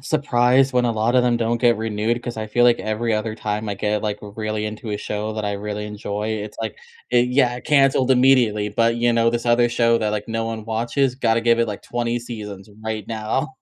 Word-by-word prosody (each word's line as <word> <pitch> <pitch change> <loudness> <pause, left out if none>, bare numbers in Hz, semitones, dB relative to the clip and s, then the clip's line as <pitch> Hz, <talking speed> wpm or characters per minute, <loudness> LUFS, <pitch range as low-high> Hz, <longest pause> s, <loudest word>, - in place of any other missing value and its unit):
surprised 135 -2 +2
when 125 -1 +2
a 115 - +1
lot 110 +3 0
of 125 - +5
them 120 -1 +2
don't 115 0 -1
get 120 -2 +4
renewed 110 +2 -1
'cause 120 - -5
I 110 - -3
feel 120 +3 +2
like 120 -1 +5
every 110 +2 -2
other 110 0 -1
time 105 0 -3
I 100 - -2
get, 105 +1 -1
like, 105 -1 -2
r 105 - -8
really 110 -1 -3
into 110 +1 -6
a 105 - -1
show 105 +1 -4
that 110 - -3
I 100 - -1
really 105 +1 -4
enjoy, 105 0 -4
it's 105 -1 -4
like 110 -2 -5 0.3
eh, 125 - +5
yeah, 125 -2 +2
canceled 135 -2 +3
immediately, 125 -5 +3
but, 115 +2 +1
you 120 0 +2
know, 115 0 +3
this 120 0 -1
other 120 0 +4
show 115 -1 +2
that, 110 - -1
like, 105 -1 -3
no 115 0 -2
one 110 -1 -5
watches, 120 +4 0
gotta 115 -3 +1
give 115 0 +3
it, 115 -1 +1
like, 105 - -6
20 120 0 -2
seasons 105 -4 -8
right 110 -2 -4
now. 115 +5 -2
115 Hz, 235 wpm, -21 LUFS, 105-120 Hz, 0.3 s, of